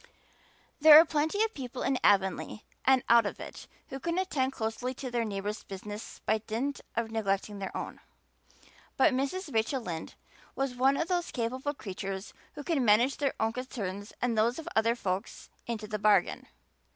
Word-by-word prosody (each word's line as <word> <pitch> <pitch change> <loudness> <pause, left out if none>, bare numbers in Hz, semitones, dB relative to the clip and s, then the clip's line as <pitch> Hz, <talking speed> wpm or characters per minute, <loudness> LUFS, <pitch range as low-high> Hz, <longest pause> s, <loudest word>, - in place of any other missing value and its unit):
There 305 0 +11
are 325 - +7
plenty 315 +7 +1
of 445 0 -1
people 255 -2 -6
in 265 -2 +1
Avonlea 195 +1 +2 0.2
and 260 -1 +5
out 230 -2 +6
of - - -6
it, - - -9 0.2
who 270 - -6
can 335 +5 -2
attend 290 -9 0
closely 245 +2 -3
to 260 -1 -6
their 240 -1 0
neighbor's 210 0 -3
business 205 +2 -8
by 220 - +2
dint 230 +6 -3
of 230 -1 -1
neglecting 205 -2 -1
their 195 - -4
own; - - -6 1.0
but 310 - +5
Mrs. 280 +6 -2
Rachel 225 +5 +1
Lynde 170 -8 -6 0.4
was 270 -2 -1
one 265 +3 +3
of 330 - -1
those 355 -2 0
capable 255 +4 -2
creatures 195 -2 -6 0.2
who 290 - -7
can 295 -4 +1
manage 235 +5 +4
their 280 -2 0
own 220 0 +1
concerns 205 -6 -5
and 245 -2 +1
those 230 +3 +2
of 325 0 -7
other 230 +1 +3
folks 190 -4 -4 0.2
into 225 -2 -3
the 210 0 -4
bargain. 205 -3 +2
235 Hz, 175 wpm, -30 LUFS, 210-275 Hz, 1.0 s, There